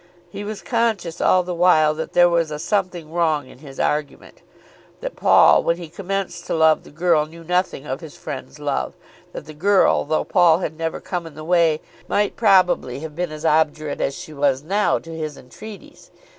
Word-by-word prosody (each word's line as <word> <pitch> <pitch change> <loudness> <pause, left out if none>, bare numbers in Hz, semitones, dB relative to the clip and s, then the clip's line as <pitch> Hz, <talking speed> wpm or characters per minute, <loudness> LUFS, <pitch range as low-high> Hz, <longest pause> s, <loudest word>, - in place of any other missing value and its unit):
He 200 0 -6
was 210 0 -6
conscious 220 -8 -1
all 185 -1 +4
the 180 0 -4
while 170 -3 +4
that 160 +1 -6
there 175 0 +6
was 170 -2 +1
a 150 - -5
something 175 -3 -2
wrong 160 -5 0
in - - -16
his 135 -2 -12
argument, 150 -1 -3 0.6
that - - -6
Paul - - +5
when 170 - 0
he 170 -2 -9
commenced 195 +2 -4
to - - -1
love 160 -1 +4
the - - -15
girl 160 -1 +1
knew 165 +1 -13
nothing 180 -4 -1
of 135 +2 -5
his 160 -3 -11
friend's 135 +2 -8
love, 145 -2 -3 0.4
that - - -8
the 155 - -10
girl, 195 +6 +3
though 155 +1 0
Paul 165 -2 +4
had 160 -3 -4
never 165 0 -3
come 175 -3 -5
in 155 - -13
the 155 - -9
way, 165 -2 +2 0.3
might 205 0 0
probably 185 - +2
have 155 -2 -8
been 175 -1 -3
as 155 +1 -7
obdurate 155 -1 +1
as 135 - -1
she 155 - -9
was 140 -2 0
now 200 +6 +1
to 165 0 -9
his 155 -3 -5
entreaties. 205 +11 -13
165 Hz, 200 wpm, -21 LUFS, 150-180 Hz, 0.6 s, there